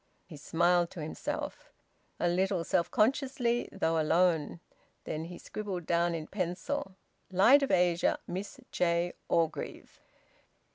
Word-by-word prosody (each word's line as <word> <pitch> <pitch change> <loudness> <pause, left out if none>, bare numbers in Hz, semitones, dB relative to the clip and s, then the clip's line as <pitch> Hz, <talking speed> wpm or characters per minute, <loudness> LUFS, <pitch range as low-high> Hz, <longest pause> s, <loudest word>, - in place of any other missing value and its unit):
He 170 - -11
smiled 170 +3 +2
to 170 - -8
himself 155 - -5 0.5
a 175 - +2
little 185 0 +1
self 170 - +1
consciously, 245 0 +1
though 165 0 0
alone. 165 0 +2 0.4
Then 155 +1 -4
he 175 +1 -8
scribbled 195 -5 -5
down 170 0 +1
in 160 -2 -4
pencil 190 - -3 0.3
"Light 200 +10 +6
of 275 - 0
Asia. 175 -1 +3
Miss 190 +3 -6
J. 170 0 +1 0.2
Orgreave." 165 -2 -2
175 Hz, 125 wpm, -31 LUFS, 170-195 Hz, 0.5 s, Light